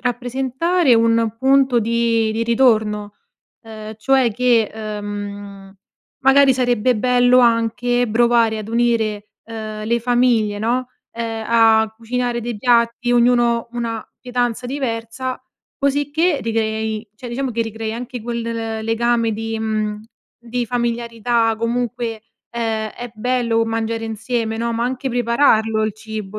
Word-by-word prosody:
rappresentare 260 +6 0
un 230 -1 +2
punto 265 -1 +3
di 230 0 +1
di 225 +1 -1
ritorno, 220 -4 +2 0.5
uhm, 220 -1 -9
cioè, 260 +2 +2
che, 235 -1 +2
uhm, 205 -2 -7 0.5
magari 270 0 +6
sarebbe 245 -1 +1
bello 250 +2 +4
anche 240 +1 +2
provare 230 0 +3
ad 215 0 -7
unire, 225 -3 0
ehm, 215 -1 -6
le 235 +1 +1
famiglie, 235 -3 +2
no, 245 +3 0 0.2
ehm, 225 -1 -4
a 225 -1 +4
cucinare 240 +1 -2
dei 235 -1 -4
piatti, 235 +1 +2
ognuno 240 -1 +3
una 230 -2 -4
pietanza 245 -1 -2
diversa, 255 -1 -4 0.3
cosicché 290 +4 +1
ricrei 220 -1 -2
cioè, 250 - -9
diciamo 260 +2 -2
che 230 0 -2
ricrei 225 0 -5
anche 245 +2 -6
quel 235 0 -3
l 225 -1 -4
legame 230 0 +1
di 225 +1 -4
mhmm, 215 -1 -2 0.4
di 240 +1 -3
familiarità 235 -1 0
comunque, 230 -1 -2 0.3
ehm, 225 -2 -2
è 245 +2 -8
bello 230 0 0
mangiare 225 0 -2
insieme, 225 +1 -2
no, 235 +1 -2
ma 230 +1 -1
anche 260 +2 -2
prepararlo 235 -3 +2
il 215 0 0
cibo 215 -1 -7
230 Hz, 125 wpm, -19 LUFS, 220-245 Hz, 0.5 s, magari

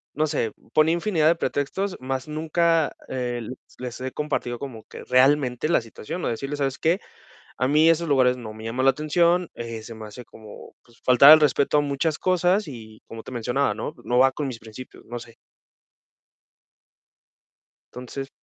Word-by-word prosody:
no 155 +1 +1
sé, 145 -7 -1 0.2
ponía 155 +2 +4
infinidad 170 -3 0
de 165 - +5
pretextos, 180 +5 -2
mas 130 +1 -4
nunca, 160 +1 +1
eh, 125 -2 -3
le 120 +3 -7 0.2
les 125 -1 -6
he 130 +1 -4
compartido 130 -5 -3
como 120 -6 -8
que - - -11
realmente 130 0 +3
la 170 - +3
situación, 115 +9 -7
o - - 0
decirles: 135 +5 -4
"¿Sabes 135 -1 -1
qué? 170 +4 +1 0.6
A 130 +2 +1
mí 155 +3 +5
esos 165 0 +2
lugares 130 -3 +3
no 115 -4 -8
me 110 0 -10
llaman 125 +4 -1
la 135 - +8
atención, 170 +4 +1
eh, 115 -1 -6
se 115 - -9
me 110 -1 -9
hace 120 +4 -10
como, 110 -2 -13
pues 120 0 -24
faltar 130 +3 +8
el 155 - +9
respeto 150 0 +2
a - - +5
muchas 145 +2 -1
cosas" 185 +2 +2
y 110 -6 -11
como 115 0 -9
te - - -11
mencionaba, 125 +3 0
¿no? - - -5
No 125 +1 +1
va 130 +1 +5
con 145 +1 -3
mis 125 -3 -6
principios, 115 +3 -12
no 120 +1 -6
sé. 115 -1 -14 2.6
Entonces. 130 +2 -7
135 Hz, 180 wpm, -24 LUFS, 120-155 Hz, 2.6 s, el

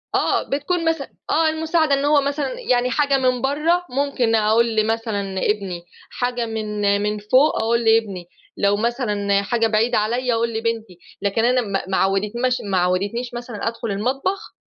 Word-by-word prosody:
آه. - - +1
بتكون 325 +5 -1
مثلًا 320 -4 -2 0.2
آه 320 0 +3
المساعدة. 315 -1 +1
إن 275 +1 +1
هو 290 -1 +4
مثلًا 290 - -2
يعني 250 - +1
حاجة 280 0 +2
من 255 -2 +1
برّه 315 +6 +1
ممكن 255 -4 0
أقول 220 +1 +2
لمثلًا 220 -1 0 0.2
لابني، 195 -5 -2 0.3
حاجة 245 -1 -2
من 210 -2 -1
من 210 0 -1
فوق، 255 +9 +3
أقول 235 +1 +2
لابني، 220 -5 +2 0.3
لو 200 0 +2
مثلًا 210 -4 0
حاجة 225 +3 +1
بعيدة 225 +2 +1
عليّا 240 +4 0
أقول 230 0 0
لبنتي، 225 -4 -3 0.2
لكن 205 +3 +1
أنا 250 +1 +3
ما 200 -4 -2
ما 190 - 0
عوّدتناش 210 +6 0
ما 195 -2 0
عوّدتنيش 200 +7 -1
مثلًا 240 -3 -5
أدخُل 230 -1 -3
المطبخ 270 - -2
230 Hz, 160 wpm, -21 LUFS, 210-270 Hz, 0.3 s, هو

